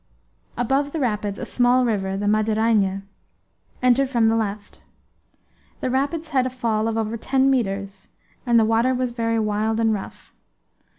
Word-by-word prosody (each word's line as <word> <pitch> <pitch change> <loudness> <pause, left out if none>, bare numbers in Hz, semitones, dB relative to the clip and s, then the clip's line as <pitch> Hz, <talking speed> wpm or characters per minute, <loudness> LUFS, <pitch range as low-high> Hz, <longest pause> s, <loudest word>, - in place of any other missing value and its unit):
Above 270 +4 0
the 325 - -2
rapids 210 -6 -1
a - - -5
small 250 +1 +2
river, 195 -4 -1
the 205 - -3
Madeirainha, 215 -2 +1 0.8
entered 255 +2 +3
from 235 -4 +2
the 225 - +2
left. 210 -2 -4 1.0
The 255 - -2
rapids 295 +5 -1
had 260 -4 +1
a - - -2
fall 230 -3 -1
of 225 0 -2
over 225 +1 -2
ten 265 +3 +1
metres, 195 -5 -2 0.3
and 235 -2 +3
the 220 - +3
water 230 +4 +2
was 250 -1 -1
very 230 -1 -1
wild 215 +1 0
and 225 -1 +2
rough. 200 - -8
225 Hz, 160 wpm, -22 LUFS, 215-255 Hz, 1.0 s, entered